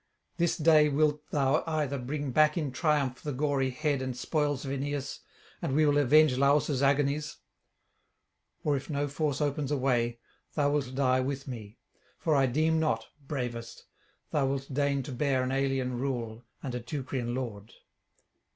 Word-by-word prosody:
This 170 -1 +1
day 155 -1 +5
wilt 150 +1 +2
thou 140 0 +2
either 150 -4 -1
bring 140 +2 -3
back 155 +5 +4
in 150 -5 -1
triumph 140 -2 0
the 150 - -3
gory 135 -1 0
head 145 +1 -1
and 130 -1 -4
spoils 145 0 -1
of 135 - -3
Aeneas, 140 0 -3 0.4
and 135 - -1
we 155 +1 +4
will 145 0 +4
avenge 150 0 +5
Lausus' 140 0 +3
agonies; 145 +2 +1 1.3
or 145 -2 +2
if 135 +3 -5
no 145 -1 -1
force 145 0 -1
opens 145 -1 -1
a 145 - +2
way, 120 -3 +1 0.4
thou 145 -2 +2
wilt 135 -3 -1
die 130 -1 +3
with 135 +1 -3
me: 110 -4 -8 0.4
for 155 -3 +1
I 135 -1 +4
deem 160 +5 +2
not, 115 -8 0 0.2
bravest, 120 -5 -5 0.5
thou 140 -3 +2
wilt 135 0 -3
deign 140 0 +1
to 140 - -7
bear 130 0 +1
an 130 - -1
alien 135 -2 0
rule 120 -3 -3 0.2
and 130 -3 -4
a 125 - -2
Teucrian 125 -1 -3
lord.' 115 -4 -5
140 Hz, 165 wpm, -29 LUFS, 130-150 Hz, 1.3 s, day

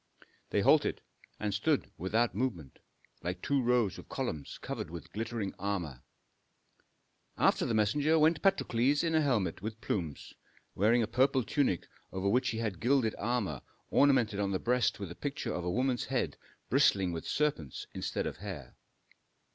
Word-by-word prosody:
They - - +1
halted - - +4 0.4
and 105 -1 -1
stood 110 +2 0
without 110 +5 +1
movement, 95 - -3 0.4
like 90 +1 -3
two 140 +7 +1
rows 120 -5 +2
of - - -13
columns 75 -3 -4
covered - - -5
with 85 0 -9
glittering 110 -2 -3
armor. 90 -10 -3 1.4
After - - +3
the 115 - 0
messenger 145 +9 +3
went 155 0 +4
Patrokles 145 -7 +2
in 165 -1 0
a 160 - +4
helmet 105 - 0
with 110 +2 -5
plumes, 80 -11 -4 0.4
wearing 115 +4 +3
a - - -1
purple 130 +3 +2
tunic 135 - 0 0.2
over 95 +1 -2
which 125 +5 +2
he 110 - -3
had 105 -6 -2
gilded 125 -3 +2
armor 105 - -1 0.3
ornamented 125 -8 +4
on 100 -1 +1
the 95 - 0
breast 125 +1 +1
with 100 -4 -5
the 85 - -8
picture 145 -1 -3
of 90 - -3
a 90 - -1
woman's 125 +4 0
head - - -1 0.3
bristling 95 -3 +3
with 80 -1 -5
serpents 135 - -1
instead - - -2
of - - -4
hair. 90 -10 -8
110 Hz, 160 wpm, -31 LUFS, 95-130 Hz, 1.4 s, halted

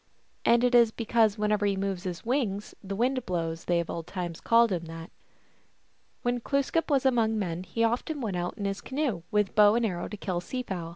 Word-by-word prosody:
And 235 +1 +5
it 250 0 +3
is 235 -2 +7
because 225 -1 +1
whenever 210 0 +1
he 200 -1 +2
moves 195 -1 -3
his 180 +1 -5
wings 225 -6 -1
the 195 0 -4
wind 255 +4 +1
blows 165 -2 -3
they 175 -1 +2
of 170 - -2
old 165 0 -5
times 175 -3 -5
called 230 -1 +4
him 170 -2 -2
that. 165 +1 -9 1.1
When 245 0 0
Glooskap 280 +7 0
was 275 -3 +2
among 230 -4 +2
men 175 -4 -2
he 230 +5 -2
often 245 +7 0
went 215 -7 -3
out 175 +3 -3
in 205 - -4
his 195 -1 -2
canoe 260 - -2
with 210 -2 +1
bow 210 0 +6
and 235 0 +2
arrows 175 -5 -3
to 210 - -7
kill 185 -3 -2
sea 255 +7 -4
fowl. 175 -7 -5
210 Hz, 215 wpm, -28 LUFS, 180-235 Hz, 1.1 s, is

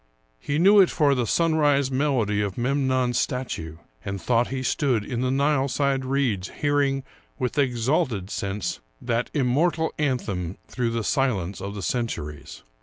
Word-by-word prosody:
He 145 - -2
knew 200 +5 +6
it 190 - +6
for 145 -3 +3
the 125 -3 0
sunrise 145 -4 +2
melody 130 -7 +1
of 100 -2 -3
Memnon's 130 -1 +1
statue, 85 -11 -3 0.3
and 100 0 -4
thought 120 +5 +1
he 130 -1 -4
stood 125 -4 +1
in 120 +1 -3
the 130 - +1
Nileside 140 -1 +1
reeds, 130 -8 0
hearing, 140 -2 0 0.3
with 125 +3 -1
exalted 125 - 0
sense, 100 -1 -3 0.2
that 120 0 -1
immortal 155 +5 +1
anthem 100 - -2
through 120 -2 -1
the 115 -1 -2
silence 100 -9 0
of 100 +1 -5
the 100 - -5
cen 120 +7 0
turies. 75 -7 -7
130 Hz, 150 wpm, -25 LUFS, 105-140 Hz, 0.3 s, knew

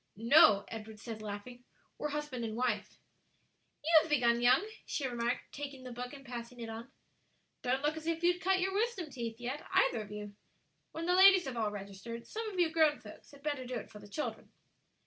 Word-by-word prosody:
"No," 225 -2 +6
Edward 220 -1 -8
said, 220 0 -7
laughing, 215 +4 -7 0.4
"we're 300 - -1
husband 295 -4 -3
and 220 -1 -3
wife." 235 -4 -1 0.9
"You've 320 0 +5
begun 240 -5 +3
young," 250 +12 +5 0.2
she 285 - -3
remarked, 240 0 -2
taking 275 -2 -7
the 255 - -7
book 245 +1 -5
and 275 -1 -11
passing 240 -1 -7
it 230 -1 -5
on; 230 +4 -8 0.7
"don't 260 +2 0
look 300 +1 +1
as 315 0 -7
if 330 0 -1
you'd 355 +1 +3
cut 380 0 +3
your 380 +1 0
wisdom 405 -7 -1
teeth 230 -2 -5
yet, 255 +5 -4
either 230 - +3
of 210 - -9
you. 210 -1 -6 0.6
When 325 +1 -4
the 355 - +2
ladies 380 -1 +8
have 265 -2 -4
all 220 -2 0
registered, 205 +3 -7
some 445 0 -4
of 390 - -8
you 335 -2 +3
grown 315 -2 +4
folks - - -13
had 280 -1 -16
better 290 -3 -2
do 250 0 -5
it 225 - -6
for 210 - -10
the 205 - -12
children." 300 +8 -4
250 Hz, 205 wpm, -33 LUFS, 230-315 Hz, 0.9 s, ladies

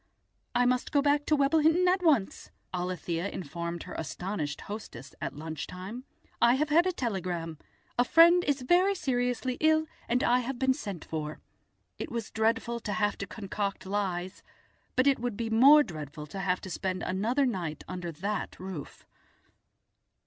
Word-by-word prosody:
"I 245 - +4
must 250 0 +1
go 285 -2 +3
back 290 0 +2
to 305 - +4
Webblehinton 320 +5 +4
at 365 +1 +3
once," 285 - +1 0.2
Alethia 180 0 -2
informed 170 +1 -5
her - - -9
astonished 160 -2 -4
hostess 200 - -8
at - - -4
lunch 155 0 -5
time; 195 +8 -7 0.4
"I 235 +1 +6
have 305 +3 0
had 340 +4 +5
a - - +2
telegram. 180 - -3 0.4
A - - +7
friend 340 +6 +6
is 280 -3 0
very 365 +8 +4
seriously 250 -4 -1
ill 315 0 +4 0.2
and 245 +1 +2
I 245 +1 +4
have 250 +1 -3
been 265 +1 +3
sent 200 - -6
for." 155 -1 -4 0.6
It - - -5
was 230 -2 -4
dreadful 225 +1 0
to 215 -2 -4
have 205 -1 +1
to 200 - -4
concoct 200 -1 -4
lies, 190 -2 -2 0.5
but 255 - +3
it 275 -1 +4
would 240 -3 -3
be 225 -1 -3
more 280 +7 +8
dreadful 150 - -7
to 195 +6 -7
have 185 -1 0
to 190 - -7
spend 185 +1 -2
another 230 +9 +1
night 180 -10 -3
under 180 -2 -5
that 200 +7 -4
roof. 185 -6 -8
220 Hz, 165 wpm, -29 LUFS, 180-265 Hz, 0.6 s, more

